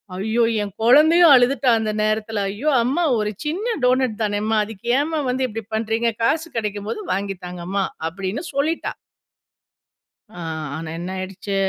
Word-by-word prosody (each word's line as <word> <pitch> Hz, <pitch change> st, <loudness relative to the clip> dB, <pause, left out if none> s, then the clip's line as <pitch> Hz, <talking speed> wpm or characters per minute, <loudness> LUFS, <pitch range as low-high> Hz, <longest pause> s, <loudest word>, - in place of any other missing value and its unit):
ஐயோ! 220 Hz, +5 st, 0 dB, 0.2 s
என் 200 Hz, -2 st, -6 dB
குழந்தையும் 310 Hz, +8 st, +6 dB
அழுதுட்டா, 250 Hz, +1 st, +3 dB
அந்த 215 Hz, -1 st, -1 dB
நேரத்தில. 215 Hz, 0 st, -1 dB
"ஐயோ! 255 Hz, +10 st, -1 dB
அம்மா 275 Hz, +8 st, 0 dB, 0.2 s
ஒரு 210 Hz, -, 0 dB, 0.2 s
சின்ன 410 Hz, +10 st, -1 dB
டோனட் 250 Hz, -3 st, +2 dB
தானே 205 Hz, -1 st, 0 dB
அம்மா. 220 Hz, 0 st, +1 dB
அதுக்கு 215 Hz, 0 st, -11 dB
ஏம்மா 310 Hz, +1 st, -1 dB
வந்து 255 Hz, +1 st, 0 dB
இப்படி 225 Hz, +1 st, -5 dB
பண்ணுறீங்க? 225 Hz, +1 st, 0 dB
காசு 320 Hz, +7 st, +1 dB
கெடைக்கும் 205 Hz, -1 st, -3 dB
போது 425 Hz, -, -3 dB
வாங்கி 195 Hz, +1 st, -2 dB
தாங்கம்மா." 180 Hz, +2 st, -3 dB, 0.3 s
அப்படின்னு 195 Hz, -, -4 dB
சொல்லிட்டா. 305 Hz, +4 st, -1 dB, 1.4 s
அ, 195 Hz, -, -12 dB, 0.4 s
ஆனா 160 Hz, +1 st, -6 dB
என்னாயிடுச்சு. 185 Hz, +2 st, -5 dB
220 Hz, 145 wpm, -21 LUFS, 200-265 Hz, 1.4 s, குழந்தையும்